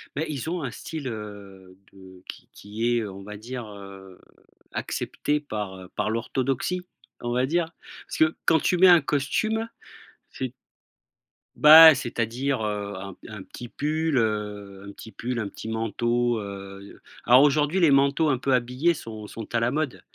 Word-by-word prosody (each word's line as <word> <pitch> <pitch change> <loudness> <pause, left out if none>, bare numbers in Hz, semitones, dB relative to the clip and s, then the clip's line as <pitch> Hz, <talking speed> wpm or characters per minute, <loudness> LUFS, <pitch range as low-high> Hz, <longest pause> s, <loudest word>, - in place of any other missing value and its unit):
Bah 155 - -1
ils 150 +1 -4
ont 175 -1 -2
un 130 -3 -4
style, 150 0 -7
heu, 100 -4 -9 0.2
de 95 -1 -15
qui - - -10
qui 110 +4 -3
est, - - +2
heu, 105 -3 -5
on 95 +1 -10
va 105 0 -8
dire, 120 +2 -7
heu, 95 -2 -12 0.5
accepté 150 0 -2
par, 105 -9 -5
heu 90 - -12
par 105 0 -1
l'orthodoxie, 135 +9 -2 0.4
on 120 0 -3
va 125 +1 +1
dire. 165 +2 -1 0.4
Parce - - -6
que 155 0 +3
quand 160 - +4
tu 180 - +1
mets 185 +1 +7
un 175 -2 +8
costume, 215 +11 -1 0.6
c'est 130 -2 -5 1.0
Bah, 160 +1 +10
c'est 120 -2 -5
à - - +3
dire, 130 +2 -2
heu, 100 -1 -3
un 95 0 -7
p - - -16
un 105 -3 -8
petit 120 - -10
pull, 155 +2 -1
heu, 105 -3 -2
un - - -8
petit 110 - -12
pull, 120 +5 -4
un 105 -4 -3
petit 110 - -10
manteau, 120 +1 0
heu 100 0 -9 0.2
alors 125 +3 +7
aujourd'hui 150 +5 +2
les 155 -4 +5
manteaux 140 +3 +3
un 130 - +2
peu 135 +1 0
habillés 125 +7 +1
sont 110 -7 -8
sont 115 +2 -9
à 115 - +2
la 115 +1 +1
mode 150 -1 -2
120 Hz, 180 wpm, -25 LUFS, 105-145 Hz, 1.0 s, Bah